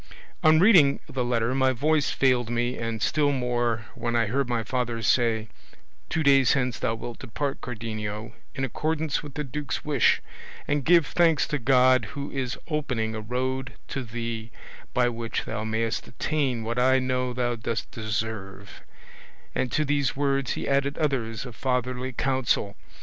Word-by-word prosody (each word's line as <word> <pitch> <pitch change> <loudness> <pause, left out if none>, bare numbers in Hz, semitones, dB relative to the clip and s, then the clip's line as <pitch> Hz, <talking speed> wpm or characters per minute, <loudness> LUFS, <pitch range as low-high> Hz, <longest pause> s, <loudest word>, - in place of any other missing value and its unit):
On 155 0 +6
reading 170 -8 +6
the 130 -1 -2
letter 120 0 0
my 130 0 +3
voice 150 +4 +2
failed 125 -3 +2
me, 120 +1 0
and 115 -1 -3
still 145 -2 +2
more 120 -4 0
when 120 0 -2
I 115 -1 +3
heard 125 +4 -1
my 120 -2 0
father 120 -2 -2
say, 115 -3 +2 0.6
'Two 160 - 0
days 135 -2 +5
hence 125 -3 0
thou 115 - 0
wilt 115 +1 -7
depart, 140 +4 -3
Cardenio, 110 -2 -5 0.2
in 135 - -2
accordance 155 +3 -1
with 145 -3 -10
the 150 - -2
duke's 145 +2 -4
wish, 145 -5 +3 0.5
and 145 -1 +1
give 170 +2 +5
thanks 165 -3 +3
to 150 - -1
God 130 -1 +4
who 140 0 -4
is 130 -2 -3
opening 125 -8 -1
a 110 - -4
road 130 +3 -2 0.2
to 135 - -3
thee 115 -1 -5 0.4
by 125 -1 +2
which 115 -1 -3
thou 110 -1 -3
mayest 110 +1 -1
attain 130 -3 -1
what 115 +2 -2
I 130 +1 +5
know 130 -1 0
thou 120 -1 -1
dost 110 -1 -3
deserve; 105 -3 -5 0.7
and 130 -2 -1
to 155 - +1
these 140 -2 +1
words 140 -1 0
he - - -4
added 140 +1 +1
others 135 -6 -1
of 125 -3 -9
fatherly 125 0 -1
counsel. 130 -5 0
125 Hz, 165 wpm, -26 LUFS, 115-140 Hz, 0.7 s, On